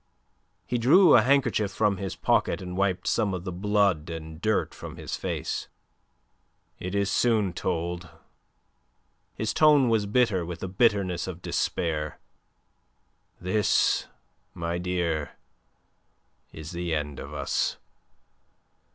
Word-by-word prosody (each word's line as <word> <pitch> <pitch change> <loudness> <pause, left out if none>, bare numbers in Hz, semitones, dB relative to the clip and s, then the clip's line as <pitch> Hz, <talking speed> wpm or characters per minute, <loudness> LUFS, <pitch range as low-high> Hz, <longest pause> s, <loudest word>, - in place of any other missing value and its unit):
He 120 - -1
drew 155 +8 +6
a 120 - +7
handkerchief 125 -5 +2
from 100 0 +1
his 95 -2 -4
pocket - - +1
and 90 -1 -6
wiped 95 -1 0
some 100 -4 +1
of 90 - -6
the 90 - -4
blood 100 -3 +1
and 80 0 -7
dirt 110 -1 0
from - - -9
his - - -5
face. - - -3 1.1
"It 90 +2 -4
is 100 -1 +1
soon 110 -6 +2
told." 85 -1 -3 1.3
His 110 0 -2
tone 150 -5 +5
was 110 -3 +1
bitter 105 -5 +2
with 85 0 -7
the - - -3
bitterness 95 -3 +1
of 90 -1 -7
despair. 75 -3 -2 1.2
"This, 100 +4 +2 0.5
my 85 +1 -2
dear, 85 -4 -2 1.2
is 80 0 -9
the 85 -1 -2
end 75 -2 -4
of 70 - -8
us. 70 -3 -1
95 Hz, 125 wpm, -26 LUFS, 85-105 Hz, 1.3 s, a